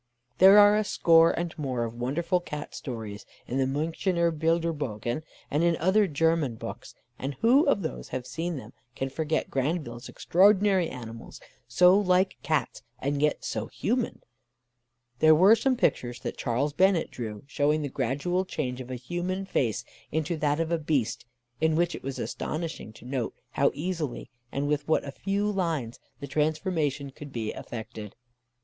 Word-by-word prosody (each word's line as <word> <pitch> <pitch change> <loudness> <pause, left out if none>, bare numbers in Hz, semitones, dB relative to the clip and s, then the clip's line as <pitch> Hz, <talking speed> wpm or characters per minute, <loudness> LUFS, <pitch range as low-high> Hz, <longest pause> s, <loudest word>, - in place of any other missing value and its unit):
There 195 +2 +9
are 205 0 +8
a 215 - +2
score 165 -4 +5
and 170 -1 -2
more 130 -5 -1
of 115 -1 -4
wonderful 155 +9 0
Cat 150 -4 -7
stories 110 -6 -6 0.2
in 130 - -2
the 135 - +3
Münchener 165 +5 0
Bilderbögen, 155 -7 -1 0.3
and 150 +3 +2
in 170 -1 +3
other 195 +5 +3
German 160 -4 +1
books; - - -8 0.2
and 135 +1 -4
who 265 +7 +5
of 210 -9 +2
those 160 - -5
who - - -2
have 125 - -8
seen 165 +6 -3
them 130 - -10 0.2
can 135 - -2
forget 155 +2 -1
Grandville's 135 -3 -2
extraordinary 195 -1 +3
animals, 115 -2 -9 0.3
so 180 +9 +6
like 185 -1 +2
Cats, 155 -2 -1 0.2
and 140 +1 -2
yet 150 0 +1
so - - -3
human. 240 +1 -2 1.0
There 155 0 +7
were 190 +7 +7
some 255 +3 +1
pictures 120 - 0
that - - -4
Charles 135 +4 -1
Bennett 190 0 +3
drew, 110 -4 -6
showing 145 +2 +1
the - - -1
gradual 145 +9 -1
change 125 -8 -4
of 125 - -9
a 130 - -3
human 175 +9 -3
face 120 - -1 0.3
into 160 +2 -1
that 150 0 +1
of 165 0 -1
a 170 - +1
beast, 145 -7 -1 0.3
in 160 0 +2
which 175 +1 +1
it - - -7
was 135 0 -5
astonishing 160 -8 -4
to 110 - -15
note 125 -2 -3 0.2
how 140 - +3
easy 155 -5 -4 0.2
and 140 +1 -1
with 150 0 -1
what 160 - +2
a 140 - -5
few 200 +6 -1
lines 165 - -2 0.2
the 140 - -5
transformation 150 -1 -1
could 145 +1 -10
be 115 -4 -3
effected. 110 -3 -8
155 Hz, 170 wpm, -27 LUFS, 130-175 Hz, 1.0 s, There